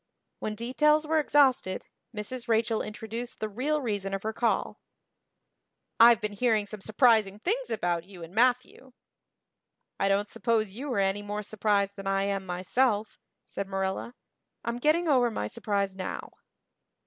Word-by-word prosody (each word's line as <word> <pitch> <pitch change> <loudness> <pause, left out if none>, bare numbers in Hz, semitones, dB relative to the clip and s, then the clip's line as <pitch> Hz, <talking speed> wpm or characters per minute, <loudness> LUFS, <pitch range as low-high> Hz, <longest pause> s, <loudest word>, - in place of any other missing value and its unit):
When 215 - -3
details 300 +7 +2
were 315 +1 +2
exhausted 270 -10 +2 0.3
Mrs. 235 +3 -5
Rachel 225 0 +1
introduced 225 +2 -6
the 215 - -2
real 275 +8 -1
reason 200 -4 -2
of 195 - -6
her 220 +1 -2
call. 230 -1 -1 1.2
"I've 230 -1 +8
been 210 -2 -3
hearing 220 -1 +1
some 205 0 -8
surprising 215 -2 +3
things 455 - -1
about 175 -5 -1
you 185 -3 -11
and 165 +2 -10
Matthew." 250 +2 +1 1.1
"I 195 - +2
don't 200 +1 +2
suppose 220 -3 0
you 260 +7 -5
are - - -1
any 195 +1 +1
more 205 +1 -4
surprised 200 -1 0
than 195 0 -6
I 195 0 +1
am 195 -1 -2
myself," 210 +5 0 0.3
said 200 - -5
Marilla. 195 +5 -3 0.5
"I'm 235 +1 -2
getting 315 +6 +2
over 255 -5 +4
my 160 - -3
surprise 200 - -2
now." 185 -1 -5
215 Hz, 150 wpm, -28 LUFS, 195-245 Hz, 1.2 s, I've